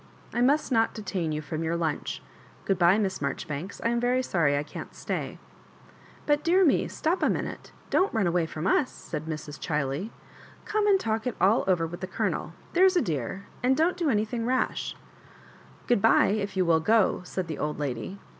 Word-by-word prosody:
"I 240 - 0
must 285 +3 +3
not 225 -2 +2
detain 190 -6 -3
you 155 0 -3
from 155 +1 -4
your 165 +1 0
lunch. 160 -3 -2 0.4
Gtood'bye, 185 +1 +4
Miss 195 -3 -1
Marjoribanks; 155 +7 -4
I 230 - +2
am 235 0 +1
very 250 +2 +1
sorry 160 - +2
I 145 - -1
can't - - -9
stay.'* - - -4 0.5
" - - -24
But, 295 0 +2
dear 360 +3 +4
me, 295 - +3
stop 335 +4 -1
a - - +3
mmute— - - -3 0.2
don't 375 - +3
run 220 -4 +1
away 170 -1 +1
from 155 +1 -5
us," 255 +7 +3
said 155 - -7
Mrs. 155 -2 -6
Chiley*.. 150 +5 -2 0.3
" - - -22
Come 425 -1 +1
and 395 -2 +5
talk 220 -2 -1
it 250 - -2
all 200 +6 +4
over 180 -3 +2
with 175 +2 -7
the 185 - -3
Colonel, 185 -5 -2 0.2
there 365 +2 +6
is 375 -1 +4
a - - +4
dear 160 +5 -3
— - - -24
and 260 +2 +3
don't 330 +3 +2
do 345 -4 0
anything 220 0 0
rash. 255 0 -1 0.9
Good 240 -5 +2
bye, 225 - +5
if 200 -2 -2
you 185 - +3
will 165 -1 +4
go," 215 +3 +3
said 185 0 -4
the 155 - -5
old 150 - -2
lady. 145 +7 -4
195 Hz, 205 wpm, -27 LUFS, 165-250 Hz, 0.9 s, there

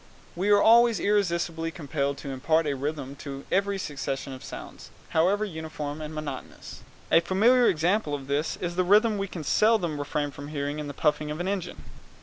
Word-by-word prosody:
We 190 +4 0
are 205 0 +6
always 230 -1 +6
irresistibly 170 -5 0
compelled 140 -3 -2
to 140 - -6
impart 155 +5 +1
a 145 - 0
rhythm 140 0 -4
to 140 -1 -7
every 200 +1 +1
succession 140 -5 -4
of 130 - -10
sounds, - - -9 0.2
however 190 +6 +2
uniform 155 -4 -6
and 155 0 -6
monotonous. 150 -4 -7 0.3
A - - +7
familiar 235 +8 +4
example 170 -1 +1
of 140 -2 -7
this 145 +3 -1
is 175 -1 -4
the 185 - +3
rhythm 210 +3 +4
we 195 - -2
can 175 -4 -7
seldom 175 -3 +2
refrain 145 0 -2
from 140 +1 -9
hearing 145 0 -3
in 150 - -4
the 145 - -7
puffing 150 -1 +1
of 150 +2 -4
an 175 - -2
engine. 190 -3 -4
160 Hz, 185 wpm, -27 LUFS, 145-195 Hz, 0.3 s, A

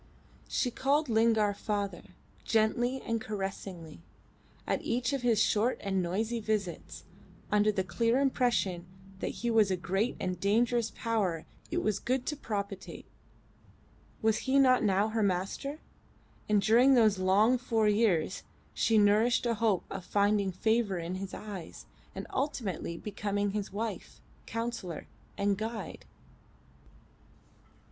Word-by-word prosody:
She 250 - 0
called 280 +4 +1
Lingard 220 -2 +3
father, 205 -2 -2 0.4
gently 240 +4 +1
and 230 -1 -2
caressingly, 195 -6 -6 0.7
at - - -1
each 250 +4 -1
of 275 - -1
his 235 -3 +2
short 220 +2 +2
and 195 -1 -1
noisy 215 +7 -1
visits, 210 -5 -3 0.5
under 210 0 +4
the 190 -2 -1
clear 230 +7 +1
impression 240 -10 +1 0.3
that - - -2 0.2
he 235 - +2
was 220 -3 +4
a 185 - 0
great 195 +6 -1
and 185 -1 -3
dangerous 230 +4 +2
power 195 -8 -1 0.2
it - - -1
was 210 -2 0
good 255 +1 -1
to 300 - -2
propitiate. 200 -6 -5 1.2
Was 220 -1 +3
he 270 - +4
not 255 -3 +5
now 200 +1 +2
her 220 0 -1
master? 200 +9 -1 0.7
And 205 -2 +3
during 245 +6 +6
those 215 -5 +4
long 205 +7 +4
four 225 -3 +1
years 205 -5 +2 0.3
she 225 - +2
nourished 215 +4 +4
a 235 - +2
hope 220 -4 +1
of 195 -2 -5
finding 200 +1 +1
favour 220 +1 +1
in 170 +1 -4
his 190 +1 -5
eyes 200 -6 -8 0.3
and - - -5
ultimately 225 - -2
becoming 205 0 -2
his 205 -1 -3
wife, 220 +2 -5 0.3
counsellor, 230 -8 -4 0.3
and 200 -1 +1
guide. 220 0 -5
215 Hz, 135 wpm, -30 LUFS, 195-235 Hz, 1.2 s, during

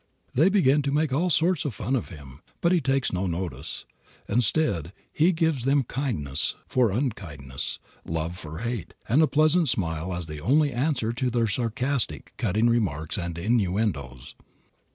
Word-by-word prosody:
They 155 +9 +5
begin 150 -8 +4
to 140 0 -1
make 150 -1 +1
all 170 +6 +2
sorts 170 +1 +3
of 140 -8 -3
fun 130 - -1
of 125 - -2
him. 70 -5 -12 0.2
But 170 - +2
he 180 -2 +3
takes 135 -3 +1
no 95 +1 0
notice. 85 -6 -4 0.4
Instead 100 - +1 0.2
he 165 +5 +4
gives 160 -6 0
them 135 +1 +3
kindness 80 - -1
for 125 -3 +2
unkindness, 85 - -3 0.3
love 80 +1 -3
for 80 0 -7
hate, 115 -8 -4
and 130 +8 +4
a 160 - +5
pleasant 155 +2 +3
smile 85 -4 -1
as 90 -1 -3
the 75 -1 -7
only 145 - +3
answer 120 -3 0
to 125 +2 -1
their 120 -1 +1
sarcastic, 120 +5 -1
cutting 110 0 +2
remarks 90 -10 0
and 85 -2 -4
innuendoes. 90 - -1
115 Hz, 160 wpm, -26 LUFS, 85-140 Hz, 0.4 s, They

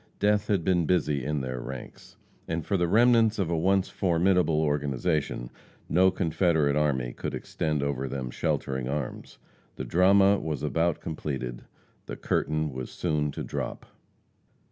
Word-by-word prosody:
Death 105 0 +2
had 100 -5 +1
been 85 -3 +2
busy 75 -7 +1
in 75 +1 -1
their 65 -1 -4
ranks; 65 +1 -9 0.3
and 80 -1 -3
for 100 - 0
the 90 -2 +2
remnants 115 +2 +4
of 95 -5 -1
a - - +1
once 95 +3 +2
formidable 90 -3 +2
organization, 75 -3 -1 0.4
no 95 +3 +4
Confederate 80 -5 +1
army 65 -5 0
could - - -4
extend 75 -2 -2
over 70 -1 -2
them 65 -1 -4
sheltering 65 0 -2
arms. 70 -2 -5 0.4
The 65 - -5
drama 95 +7 +4
was 75 -4 -4
about 85 -1 0
completed; 65 -6 -5 0.4
the - - -5
curtain 75 -2 -1
was 65 0 -5
soon 75 -4 -1
to - - -5
drop. - - -5
80 Hz, 145 wpm, -27 LUFS, 70-90 Hz, 0.4 s, remnants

